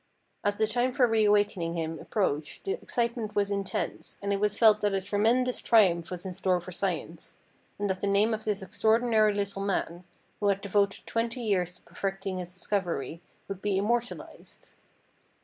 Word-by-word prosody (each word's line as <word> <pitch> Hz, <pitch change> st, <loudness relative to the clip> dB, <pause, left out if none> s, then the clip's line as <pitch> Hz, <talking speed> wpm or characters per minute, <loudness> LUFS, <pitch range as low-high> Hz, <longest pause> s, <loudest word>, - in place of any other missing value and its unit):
As 205 Hz, -1 st, +1 dB
the 220 Hz, -, +2 dB
time 245 Hz, +3 st, 0 dB
for 255 Hz, -2 st, +4 dB
re 225 Hz, -2 st, +3 dB
awakening 205 Hz, -5 st, +2 dB
him 165 Hz, -1 st, -3 dB
approached 155 Hz, -8 st, -2 dB
the 390 Hz, -, -2 dB
excitement 235 Hz, -, -2 dB
was 205 Hz, 0 st, +1 dB
intense, 200 Hz, -1 st, -3 dB
and 200 Hz, 0 st, 0 dB
it 200 Hz, -, 0 dB
was 210 Hz, 0 st, +1 dB
felt 215 Hz, -2 st, +6 dB
that 205 Hz, -1 st, +1 dB
a -, -, +2 dB
tremendous 225 Hz, +6 st, +2 dB
triumph 175 Hz, -7 st, +4 dB
was 180 Hz, 0 st, -6 dB
in 185 Hz, -, -4 dB
store 185 Hz, -1 st, +1 dB
for 175 Hz, +1 st, -9 dB
science, 175 Hz, -3 st, -4 dB, 0.4 s
and 205 Hz, -, -1 dB
that 190 Hz, -1 st, -2 dB
the 200 Hz, -, 0 dB
name 205 Hz, +3 st, +3 dB
of 220 Hz, 0 st, -3 dB
this 205 Hz, -3 st, -1 dB
extraordinary 220 Hz, +2 st, +3 dB
little 200 Hz, -1 st, -3 dB
man, 185 Hz, -3 st, -2 dB, 0.4 s
who 205 Hz, -, +1 dB
had 200 Hz, -1 st, +2 dB
devoted 200 Hz, 0 st, 0 dB
twenty 230 Hz, +2 st, -2 dB
years 180 Hz, -5 st, 0 dB
to -, -, -19 dB
perfecting 195 Hz, +1 st, -4 dB
his 180 Hz, -1 st, -6 dB
discovery, 175 Hz, -5 st, -3 dB, 0.3 s
would 195 Hz, -1 st, -6 dB
be 205 Hz, -2 st, 0 dB
immortalised. 235 Hz, +4 st, -3 dB
200 Hz, 180 wpm, -28 LUFS, 185-220 Hz, 0.4 s, felt